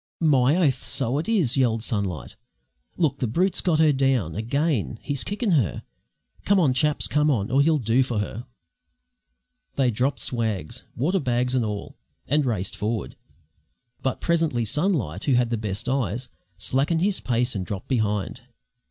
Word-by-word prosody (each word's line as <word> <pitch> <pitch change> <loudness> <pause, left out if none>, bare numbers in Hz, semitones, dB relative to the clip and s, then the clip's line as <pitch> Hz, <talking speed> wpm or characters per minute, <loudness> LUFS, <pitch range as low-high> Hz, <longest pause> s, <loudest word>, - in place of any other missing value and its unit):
"My 145 -3 +4
oath! 145 -8 +2
so 135 0 -1
it 165 - -4
is!" 180 - +2
yelled 115 -5 +1
Sunlight. 100 - -3 0.6
"Look! 145 -4 +1
the 125 - 0
brute's 180 - +1
got 170 -4 +2
her 155 -1 +5
down 130 - +1
again! 115 - -1
He's 140 -2 -2
kickin' 205 +1 -1
her. 125 - +1 0.6
Come 200 -1 +3
on, 145 -7 +3
chaps; 150 +3 +2
come 150 +1 +2
on, 115 -7 0
or 135 +2 +4
he'll 155 +2 +3
do 120 0 +2
for 125 -3 -1
her!" 105 +4 -4 1.3
They 130 -3 +2
dropped 125 +6 0
swags, 110 -10 -2
water 175 +10 +1
bags 125 -3 0
and 130 -2 +2
all, 105 -2 -5 0.3
and 145 0 +2
raced 100 -5 -1
forward; 110 +2 -3 0.9
but 130 - -2
presently 160 -9 +1
Sunlight, 130 - -1
who 140 - +2
had 120 -1 +2
the - - +2
best 105 0 -4
eyes, 125 -2 -1 0.3
slackened 140 - +1
his 195 0 +1
pace 125 0 0
and 100 -4 -3
dropped 100 0 -6
behind. 105 -6 -1
130 Hz, 160 wpm, -24 LUFS, 110-150 Hz, 1.3 s, her